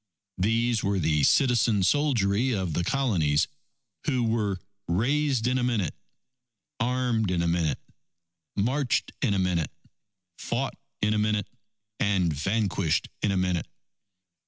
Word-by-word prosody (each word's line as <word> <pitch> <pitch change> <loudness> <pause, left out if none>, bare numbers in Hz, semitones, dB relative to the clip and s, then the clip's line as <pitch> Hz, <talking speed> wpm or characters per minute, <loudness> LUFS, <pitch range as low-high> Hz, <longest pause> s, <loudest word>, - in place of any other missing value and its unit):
These 115 +3 +1
were 100 0 +1
the 80 -3 +2
citizen 115 - +3
soldiery 125 -2 +2
of 95 -5 -2
the 85 - 0
Colonies, 85 - +1 0.6
who 130 -5 +1
"were 110 -4 0 0.3
raised 130 - +1
in 125 +1 +2
a - - -1
minute; 110 -10 0 0.9
armed 120 -3 +1
in 90 -2 +1
a - - +1
minute; 85 -2 +1 0.8
marched 125 +5 0
in 105 -7 +2
a - - +1
minute; 90 -4 0 0.7
fought - - -2 0.3
in 105 +1 +3
a 105 - +1
minute; 105 -1 0 0.5
and 95 -5 +2
vanquished 95 0 0
in 105 - +2
a 95 - 0
minute." 90 -2 0
105 Hz, 130 wpm, -27 LUFS, 90-120 Hz, 0.9 s, citizen